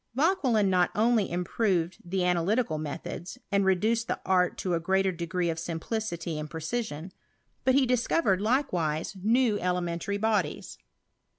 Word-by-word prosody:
Vauquelin 265 - +2
not 180 -2 +3
only 225 -1 +2
improved 180 0 0
the 185 +2 -2
analytic^ 180 +1 +1
methods, 165 +6 -6
and 200 0 +3
reduced 220 +5 +2
the - - -2
art 180 -1 +2
to 180 - -2
a 170 - +1
greater 190 +2 +1
degree 175 0 -2
of 160 - -5
implicity 170 -2 -3
and 150 0 -5
precision, 170 0 -4 0.5
but 260 - +3
he 275 -1 +5
discovered, 245 - +1
likewise, 185 - 0
lew 225 -1 +3
elementary 180 +1 -1
bodies. 205 -7 -1
190 Hz, 135 wpm, -28 LUFS, 170-225 Hz, 0.5 s, he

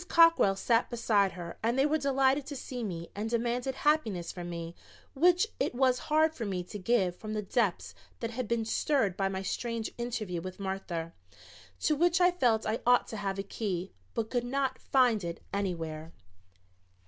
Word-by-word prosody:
Cockrell 330 -12 +5
sat 230 +4 +2
beside 210 -5 +2
her 175 -2 -8
and 235 +3 +1
they 270 - +4
were 310 +1 +2
delighted 275 0 +2
to 290 - -5
see 250 -2 -5
me 170 -5 -5
and 210 +2 -3
demanded 240 +3 -1
happiness 250 - +1
from 175 -1 -7
me 170 -1 -5 0.4
which 355 +7 +4
it - - 0
was 255 -1 +3
hard 315 +1 +4
for 250 - -5
me 190 -4 -2
to 205 +4 -8
give 190 -3 +1
from 215 +2 -6
the 210 - -2
depths 205 -2 0 0.3
that 230 -1 -3
had 245 0 -3
been 230 0 0
stirred 225 -4 +1
by 195 0 0
my 190 0 -3
strange 230 +3 -3
interview 215 -8 -3
with 185 +2 -7
Martha, 190 -4 -4 0.7
to 305 - +2
which 345 +4 +3
I 360 0 +5
felt 245 -11 +2
I 220 +2 0
ought 245 0 +4
to 220 - -5
have 195 -1 -2
a 195 - -2
key, 195 -3 -3 0.2
but 220 -1 -2
could 245 -2 0
not 265 +1 -1
find 245 -6 +3
it 170 -1 -4
anywhere. 165 -5 -3
225 Hz, 185 wpm, -30 LUFS, 190-260 Hz, 0.7 s, Cockrell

